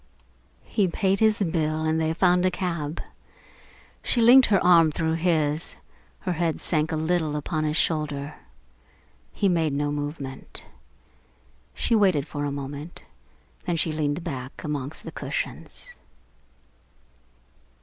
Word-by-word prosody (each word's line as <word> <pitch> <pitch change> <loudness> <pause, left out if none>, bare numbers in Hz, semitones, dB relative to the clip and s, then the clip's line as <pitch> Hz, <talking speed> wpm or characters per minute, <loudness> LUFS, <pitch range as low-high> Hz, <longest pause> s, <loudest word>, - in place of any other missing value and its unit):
He 205 -4 +1
paid 190 +2 +1
his 215 -2 +3
bill 160 -2 0
and 160 0 +1
they 160 0 +1
found 180 +1 +3
a 185 - +4
cab. 170 -4 -3 1.0
She 245 - +3
linked 245 +3 +8
her 200 -3 +4
arm 170 -3 +6
through 160 +1 -1
his, 160 -2 0 0.5
her 180 - -1
head 165 -1 -1
sank 155 -2 0
a - - 0
little 160 -1 0
upon 155 +1 -2
his 150 +1 0
shoulder. 150 -2 0 1.0
He 200 - 0
made 165 -5 +1
no 145 +1 0
movement. 145 -2 -5 1.1
She - - 0
waited 185 -9 +3
for 145 -1 -3
a 145 - -2
moment, 140 +3 -7 0.6
then 175 - +1
she 160 0 0
leaned 155 +1 -1
back 130 -5 -6
amongst 145 -1 -4
the - - -7
cushions. - - -5
160 Hz, 130 wpm, -25 LUFS, 150-180 Hz, 1.1 s, linked